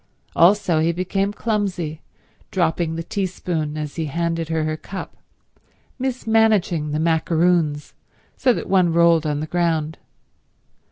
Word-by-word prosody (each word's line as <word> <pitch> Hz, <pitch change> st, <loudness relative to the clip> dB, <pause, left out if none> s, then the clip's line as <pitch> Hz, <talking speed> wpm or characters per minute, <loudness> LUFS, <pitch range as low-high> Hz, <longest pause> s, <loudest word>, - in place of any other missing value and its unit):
Also 180 Hz, -2 st, +4 dB
he 160 Hz, +2 st, +2 dB
became 190 Hz, +3 st, -1 dB
clumsy, 195 Hz, -8 st, -2 dB, 0.5 s
dropping 165 Hz, -2 st, 0 dB
the 165 Hz, -, -4 dB
teaspoon 175 Hz, -5 st, -3 dB
as 150 Hz, 0 st, -5 dB
he 165 Hz, -, -1 dB
handed 165 Hz, +1 st, -2 dB
her 160 Hz, -1 st, 0 dB
her 155 Hz, 0 st, -1 dB
cup, 190 Hz, +4 st, -8 dB, 0.8 s
mismanaging 220 Hz, -, +1 dB
the 150 Hz, +1 st, -2 dB
macaroons, 160 Hz, -1 st, +1 dB, 0.4 s
so 255 Hz, -, +3 dB
that -, -, -3 dB
one 185 Hz, -3 st, +3 dB
rolled 165 Hz, -1 st, +4 dB
on 150 Hz, -1 st, -1 dB
the -, -, -2 dB
ground. 160 Hz, -2 st, -1 dB
170 Hz, 125 wpm, -21 LUFS, 155-190 Hz, 0.8 s, Also